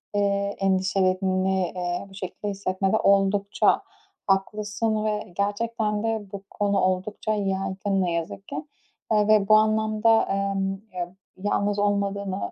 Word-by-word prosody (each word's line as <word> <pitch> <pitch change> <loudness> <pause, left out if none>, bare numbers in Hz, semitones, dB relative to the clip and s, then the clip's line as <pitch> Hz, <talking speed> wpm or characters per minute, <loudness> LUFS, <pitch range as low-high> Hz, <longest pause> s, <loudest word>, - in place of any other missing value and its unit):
eee, 200 0 +1
endişelerini, 190 -1 +1
eee, 175 +1 -2
bu - - -16
şekilde 190 +2 -6
hissetmede 195 +1 0
oldukça 200 0 +3 0.5
haklısın 215 +2 0
ve 210 -4 -2
gerçekten 210 +1 -1
de 225 -2 -1
bu 200 -1 -7
konu 200 -1 0
oldukça 185 +3 0
yaygın, 195 -1 -1
ne 180 - 0
yazık 170 +3 -4
ki. - - -6 0.6
Eee, 210 -1 +3
ve 215 -2 +4
bu 215 - +7
anlamda, 220 +1 +3 0.3
ımm, 195 0 -2
ya, 175 0 -4 0.2
yalnız 205 +1 0
olmadığını 200 -1 -1
200 Hz, 125 wpm, -25 LUFS, 190-210 Hz, 0.6 s, bu